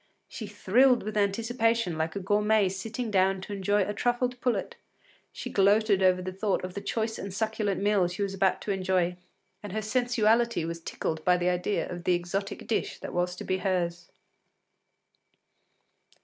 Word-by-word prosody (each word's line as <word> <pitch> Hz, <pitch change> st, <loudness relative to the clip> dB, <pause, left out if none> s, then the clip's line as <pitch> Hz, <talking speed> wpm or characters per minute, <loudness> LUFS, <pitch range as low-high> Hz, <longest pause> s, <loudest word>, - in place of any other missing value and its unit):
She 215 Hz, -, -7 dB
thrilled 240 Hz, +5 st, +3 dB
with 215 Hz, +1 st, -5 dB
anticipation 225 Hz, -1 st, +1 dB
like 160 Hz, +2 st, -2 dB
a -, -, -1 dB
gourmet 210 Hz, +1 st, +2 dB
sitting 220 Hz, +5 st, -4 dB
down 190 Hz, -1 st, +3 dB
to 205 Hz, -, -7 dB
enjoy 205 Hz, +1 st, +1 dB
a 205 Hz, -, -3 dB
truffled 245 Hz, +3 st, -1 dB
pullet; 250 Hz, -2 st, -1 dB, 0.6 s
she -, -, -7 dB
gloated 200 Hz, 0 st, +3 dB
over 185 Hz, -1 st, +3 dB
the 185 Hz, -, -4 dB
thought 195 Hz, 0 st, -1 dB
of 185 Hz, 0 st, -5 dB
the 200 Hz, -, -5 dB
choice 220 Hz, +2 st, -2 dB
and 200 Hz, -, -5 dB
succulent 210 Hz, -1 st, -1 dB
meal 205 Hz, -3 st, +3 dB
she 180 Hz, +3 st, -3 dB
was 195 Hz, -1 st, -2 dB
about 190 Hz, -1 st, +1 dB
to 205 Hz, -, -3 dB
enjoy, 185 Hz, -2 st, 0 dB, 0.4 s
and 205 Hz, -3 st, -7 dB
her 215 Hz, -, -1 dB
sensuality 235 Hz, -4 st, +2 dB
was 165 Hz, 0 st, -5 dB
tickled 160 Hz, -1 st, -4 dB
by 180 Hz, 0 st, +4 dB
the 175 Hz, 0 st, +1 dB
idea 180 Hz, +3 st, -1 dB
of 175 Hz, -1 st, -7 dB
the 180 Hz, -, +4 dB
exotic 185 Hz, +3 st, -4 dB
dish 225 Hz, -, -1 dB
that -, -, -6 dB
was 180 Hz, 0 st, 0 dB
to -, -, -7 dB
be 185 Hz, 0 st, -1 dB
hers. 175 Hz, -2 st, -1 dB
200 Hz, 175 wpm, -28 LUFS, 185-220 Hz, 0.6 s, by